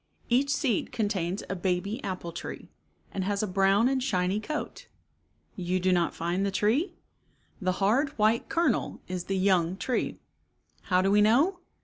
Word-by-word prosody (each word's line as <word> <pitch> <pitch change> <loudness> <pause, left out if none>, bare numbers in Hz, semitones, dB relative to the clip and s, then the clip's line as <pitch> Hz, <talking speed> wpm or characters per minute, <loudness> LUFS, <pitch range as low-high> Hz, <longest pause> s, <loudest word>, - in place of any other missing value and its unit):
Each 260 +4 +3
seed 260 - 0
contains 205 -5 -1
a 190 - -3
baby 190 +6 -2
apple 185 -3 -4
tree, - - -8 0.4
and 190 - -2
has 200 +2 -1
a - - 0
brown 195 +4 +3
and 265 0 +1
shiny 190 -5 0
coat. 305 +7 -5 0.7
You 185 0 -1
do 185 +1 +2
not 175 -2 +1
find 175 +3 -1
the 200 - +1
tree? 220 - +1 0.7
The 185 -1 +1
hard 220 +10 +2
white 215 +2 +2
kernel 330 -8 0
is 180 -1 -4
the 195 - -1
young 185 -2 +2
tree. 250 +4 -2 0.7
How 185 -1 +3
do 195 - +2
we 210 +1 +5
know? 280 - +4
200 Hz, 160 wpm, -28 LUFS, 185-235 Hz, 0.7 s, we